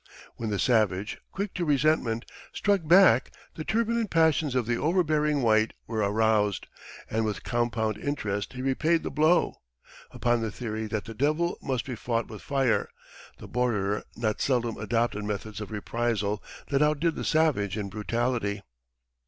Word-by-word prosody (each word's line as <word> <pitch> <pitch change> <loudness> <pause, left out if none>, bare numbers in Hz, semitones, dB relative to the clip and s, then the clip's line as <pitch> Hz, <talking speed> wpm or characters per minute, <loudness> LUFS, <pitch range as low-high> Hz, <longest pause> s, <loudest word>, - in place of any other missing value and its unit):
When 115 - -4
the 105 - -1
savage, 105 -4 +1
quick 200 0 -4
to 180 - -2
resentment, 140 -6 +1 0.3
struck 200 -6 +1
back, 175 -8 +6 0.2
the 155 - -6
turbulent 230 +3 0
passions 160 -4 +2
of 125 -3 +1
the 120 +1 0
overbearing 150 -2 +1
white 110 -1 +3
were 110 -1 -3
aroused, 105 -1 +2 0.4
and 110 +1 -1
with 105 -2 -3
compound 115 -3 -1
interest 105 -8 -3
he 130 0 -5
repaid 155 +5 +1
the - - -4
blow. 155 +3 +2 0.5
Upon 120 -1 0
the 110 - -1
theory 110 0 -4
that 105 -1 -3
the 115 - -7
devil 155 +8 0
must 130 -3 -2
be 130 - -4
fought 115 0 -2
with 110 -2 -9
fire, 135 -4 +1 0.5
the - - -10
borderer 105 -5 0
not 110 -2 -1
seldom 120 -4 +1
adopted 115 0 0
methods 105 +1 -4
of 105 - -6
reprisal 105 -1 -1 0.3
that 140 0 +2
outdid 150 +2 +2
the - - -5
savage 140 - +1
in 105 -2 -3
brutality. 110 0 -1
120 Hz, 155 wpm, -27 LUFS, 110-150 Hz, 0.5 s, back